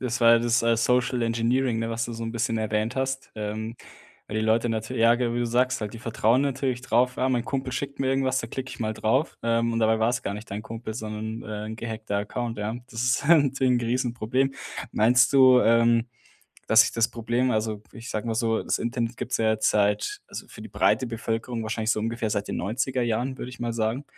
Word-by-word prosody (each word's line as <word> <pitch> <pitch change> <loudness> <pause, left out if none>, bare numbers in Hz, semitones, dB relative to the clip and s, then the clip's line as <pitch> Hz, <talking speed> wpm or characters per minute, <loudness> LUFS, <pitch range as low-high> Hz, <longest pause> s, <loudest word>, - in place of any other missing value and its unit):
das 120 -1 -2
war 115 0 +7
ja 115 - +6
das, 120 0 +2
äh, 115 0 +3
Social-Engineering, 120 0 +1
ne, 115 0 -2
was 115 0 -2
du 120 - -6
so 115 0 -5
'n 115 - -4
bisschen 115 -1 -1
erwähnt 110 +2 -1
hast. 135 0 -2
Ähm, 110 +2 -4 0.5
weil 105 - -5
die 110 - -1
Leute 115 +2 +2
natür 110 +3 -3
ja 115 +1 +5
ge 120 -1 -1
wie - - -1
du 120 - 0
sagst, 125 +2 +1
halt, 105 +1 -5
die 115 - -8
vertrauen 115 +2 +2
natürlich 135 -2 -1
drauf: 125 0 +2
„Ja, 130 - +1
mein 125 -2 0
Kumpel 130 -2 -3
schickt 140 +2 -4
mir 130 - +1
irgendwas, 135 -1 +1
da 115 - -6
klicke 130 +1 -5
ich - - -10
mal 110 -1 -1
drauf.“ 130 +8 0
Ähm, 115 0 +1
und 115 - -1
dabei 110 0 +2
war 110 - +3
es 125 +1 0
gar 100 - -3
nicht 105 +2 -9
dein 105 +2 -4
Kumpel, 115 0 -7
sondern, 110 0 -5
äh, 105 0 -5
'n 110 - -6
gehackter 110 -2 -4
Account, 115 +2 -4
ja. 105 +2 -2 0.2
Das 115 +1 -3
ist 125 - +1
halt 160 -3 +6
natürlich 135 -1 +1
'n 125 - +3
g 120 - -3
Riesenproblem. 125 +2 0 0.4
Meinst 125 +4 +4
du, 130 -2 +7
ähm, 115 +1 +3 0.6
dass 110 0 +7
sich - - -2
das 115 0 +2
Problem 120 +2 0
also, 110 -2 -1
ich 115 +2 -10
sage 110 +1 -3
mal 115 - -1
so, 115 0 0
das - - -1
Internet 115 0 -2
gibt's 125 - -2
ja 110 -1 +2
jetzt 110 0 +1
seit 105 - +1
also - - -8
für - - -11
die - - -8
breite 130 - +2
Bevölkerung 115 0 -3
wahrscheinlich 110 0 -1
so 110 - +1
ungefähr 115 0 -2
seit 100 -1 -2
den - - -3
90er 125 +6 -1
Jahren, 120 +3 -1
würde 125 - -6
ich 125 - -12
mal 120 -1 -2
sagen. 115 +5 -1
115 Hz, 240 wpm, -25 LUFS, 110-125 Hz, 0.6 s, war